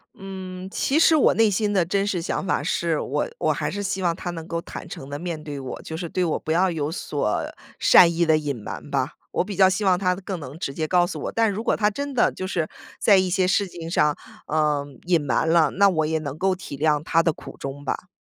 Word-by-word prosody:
嗯， 185 -1 -7
其 280 +8 +1
实 325 0 +6
我 300 - +5
内 225 -1 +4
心 205 +1 0
的 185 -4 +3
真 195 +3 0
实 185 -4 -1
想 175 - -2
法 - - 0
是， 165 -3 0
我 - - -1
我 - - +1
还 - - -2
是 205 - -4
希 195 0 -2
望 170 -2 +1
他 180 - -5
能 165 -1 -7
够 170 -1 -3
坦 - - -9
诚 135 - -8
地 145 +1 -5
面 170 -2 -4
对 145 -2 -6
我， 130 -1 -6
就 160 - -6
是 170 0 -4
对 185 - 0
我 160 - 0
不 - - -4
要 180 +3 +3
有 155 -2 -2
所 145 - -1 0.4
善 170 -2 +7
意 170 0 +1
的 160 -1 +4
隐 145 -2 -2
瞒 115 +5 -8
吧， 135 -2 0 0.2
我 - - +1
比 200 +1 -6
较 190 0 +6
希 190 +3 -1
望 185 -2 +4
他 180 -2 +1
更 190 -1 -5
能 145 0 -9
直 140 -5 -4
接 155 +2 -2
告 175 +1 +4
诉 175 - -5
我。 - - -3
但 225 -2 +2
如 210 +3 -4
果 - - +2
他 210 -2 +2
真 280 +6 -4
的 245 - +3
就 185 - -5
是 170 -4 -1 0.3
在 200 - +5
一 185 -1 +2
些 185 +1 +2
事 195 +2 +2
情 170 -2 -8
上， 150 -4 +3 0.3
呃， 150 -2 +1 0.2
隐 175 -2 +3
瞒 140 +3 +1
了， 160 -2 +4
那 200 +2 +4
我 160 -4 +1
也 160 +1 0
能 145 -3 -5
够 190 +2 +1
体 180 -6 -8
谅 150 0 +2
他 165 +1 +3
的 165 - +2
苦 - - -11
衷 140 +1 -7
吧。 180 - -3
175 Hz, 275 characters per minute, -24 LUFS, 155-190 Hz, 0.4 s, 善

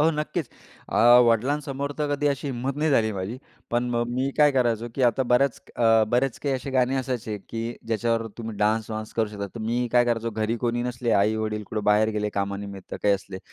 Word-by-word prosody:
हो, 160 +2 +5
नक्कीच. 150 -1 -3 0.4
अ, - - -2 0.3
वडिलांसमोर 140 +4 0
तर 145 -1 0
कधी 145 +1 -1
अशी 140 0 -2
हिम्मत 130 +1 -3
नाही 155 +1 +1
झाली 110 -5 +3
माझी. 100 +6 -4 0.3
पण 120 +1 +1
मग 120 0 0
मी 130 +2 0
काय 150 -1 +6
करायचो, 120 -3 +1
की 135 - -1
आता 125 +3 0
बऱ्याच 135 +2 +3 0.2
अं, 115 -2 +4
बरेच 125 +1 +1
काही 140 -2 0
असे 130 +1 -4
गाणे 130 0 +2
असायचे, 125 -5 -3
की 115 +1 -4
ज्याच्यावर 115 0 0
तुम्ही 115 -2 -6
डान्स 110 +2 +1
वांस 110 0 -5
करू 110 -2 +1
शकता, 100 -1 -5
तर 115 - -6
मी 120 +3 0
काय 120 0 +5
करायचो, 115 -1 -1
घरी 110 +1 -1
कोणी 120 0 0
नसले, 120 -1 -2
आई-वडील 105 +1 +1
कुठं 105 -2 -3
बाहेर 105 +1 +4
गेले 105 0 0
कामानिमित्त 100 -1 -4
काही 100 -1 +4
असले, 95 -1 -7
120 Hz, 205 wpm, -25 LUFS, 110-130 Hz, 0.4 s, काय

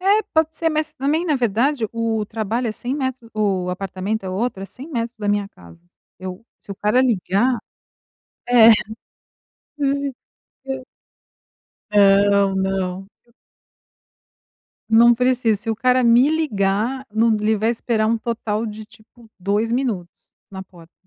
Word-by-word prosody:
É, 400 +3 +3
pode 320 0 +2
ser, 330 - +1
mas 310 -1 -2
também 305 +4 0
na 315 -4 +1
verdade, 240 +2 +1
o 225 -2 -1
trabalho 225 +3 -2
é - - -2
100, 245 +4 -4
metros 260 -4 -4
o 195 -4 0
apartamento 195 +3 -4
é - - -4
outro, 195 +1 -2
é - - -6
100 260 +8 -11
metros 235 -5 -4
da 205 -1 -3
minha 205 -1 0
casa. 85 - -17 0.4
Eu 185 +3 -8 0.2
se - - -15
o - - -4
cara 210 +6 +2
ligar 235 0 +1 0.9
É, 235 -2 +8 1.1
hum, 280 0 0 0.6
eu 265 -1 -5 1.1
Não, 200 -1 +4
não, 190 -1 -2 0.2
eu 235 - -29 1.6
Não 235 +2 +6
precisa, 245 -3 +1
se 225 0 -3
o 220 - -2
cara 255 +2 +2
me 240 +4 +5
ligar, 255 -4 -1
não, 225 +1 +3
ele 215 +1 +2
vai 220 +2 +1
esperar 230 -2 0
um 230 +1 +1
total 225 -1 -3
de 215 0 -7
tipo 225 +1 -20
2 205 +5 0
minutos 225 -9 -2 0.4
na 190 -1 -7
porta 170 -3 -18
225 Hz, 150 wpm, -21 LUFS, 200-255 Hz, 1.6 s, É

